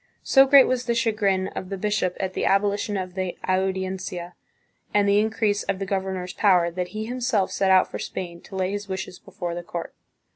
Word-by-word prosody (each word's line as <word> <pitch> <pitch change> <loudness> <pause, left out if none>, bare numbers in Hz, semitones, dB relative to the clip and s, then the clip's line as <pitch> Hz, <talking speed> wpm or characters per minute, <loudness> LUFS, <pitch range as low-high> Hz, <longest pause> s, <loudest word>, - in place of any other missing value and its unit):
So 270 0 +6
great 275 -1 +8
was 255 -1 -1
the 235 -1 0
chagrin 205 -5 +1
of 185 - -7
the 195 - -4
bishop 200 -2 -1
at 190 -1 -2
the - - -2
abolition 205 +1 +1
of 185 -1 -4
the 185 -1 -3
Audiencia 185 -2 -2 0.6
and 205 -1 +4
the 200 +1 +4
increase 215 -1 +1
of 195 -1 -2
the 195 - -3
governor's 190 -1 -3
power, 180 -4 +3
that 180 +1 -3
he 215 +4 -5
himself 240 -5 0
set 195 - +1
out 185 -1 +5
for - - -5
Spain 170 -2 -6
to - - -10
lay 185 0 0
his 205 0 -4
wishes 190 -1 -5
before 175 -1 -6
the 175 - -4
court. 170 -1 -6
190 Hz, 205 wpm, -24 LUFS, 185-210 Hz, 0.6 s, great